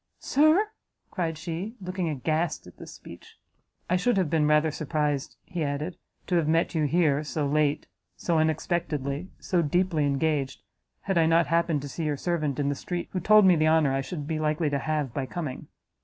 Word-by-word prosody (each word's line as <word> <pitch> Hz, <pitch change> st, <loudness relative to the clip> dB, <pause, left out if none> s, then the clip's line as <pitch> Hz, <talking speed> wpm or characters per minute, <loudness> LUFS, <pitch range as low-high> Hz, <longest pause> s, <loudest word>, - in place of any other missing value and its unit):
"Sir!" 310 Hz, +9 st, +3 dB, 0.4 s
cried 165 Hz, -4 st, -2 dB
she, 175 Hz, +7 st, -5 dB
looking 185 Hz, -2 st, -3 dB
aghast 155 Hz, +3 st, -1 dB
at 90 Hz, -, -14 dB
this -, -, -10 dB
speech. -, -, -13 dB, 0.5 s
"I 180 Hz, -, +2 dB
should 205 Hz, +4 st, +1 dB
have 180 Hz, -6 st, +1 dB
been 155 Hz, -2 st, +3 dB
rather 150 Hz, +1 st, +3 dB
surprised," 150 Hz, -2 st, -2 dB
he 175 Hz, -3 st, -3 dB
added, 150 Hz, +4 st, -3 dB, 0.3 s
"to 180 Hz, -, +1 dB
have 160 Hz, -3 st, +1 dB
met 165 Hz, +2 st, +2 dB
you 155 Hz, -2 st, +1 dB
here, 150 Hz, -2 st, +2 dB
so 150 Hz, +1 st, -2 dB
late, 150 Hz, +1 st, +1 dB, 0.3 s
so 170 Hz, -2 st, +1 dB
unexpectedly, 155 Hz, -1 st, -1 dB
so 180 Hz, -3 st, 0 dB
deeply 165 Hz, -1 st, +1 dB
engaged 140 Hz, -1 st, -1 dB, 0.4 s
had 195 Hz, -3 st, 0 dB
I 160 Hz, -, +4 dB
not 165 Hz, +1 st, +4 dB
happened 165 Hz, -3 st, +1 dB
to -, -, -5 dB
see 160 Hz, +3 st, -4 dB
your 150 Hz, -2 st, -1 dB
servant 155 Hz, -4 st, -1 dB
in 140 Hz, -, 0 dB
the -, -, +1 dB
street, 175 Hz, +5 st, -5 dB
who 185 Hz, -, -2 dB
told 215 Hz, +3 st, +6 dB
me 185 Hz, -2 st, +6 dB
the 155 Hz, -1 st, +2 dB
honour 155 Hz, -4 st, +3 dB
I 135 Hz, -, 0 dB
should 150 Hz, +1 st, -6 dB
be 155 Hz, +1 st, -2 dB
likely 155 Hz, 0 st, 0 dB
to 140 Hz, -, 0 dB
have 150 Hz, -4 st, -2 dB
by 135 Hz, -2 st, -3 dB
coming." 150 Hz, -4 st, -5 dB
155 Hz, 195 wpm, -27 LUFS, 145-175 Hz, 0.5 s, told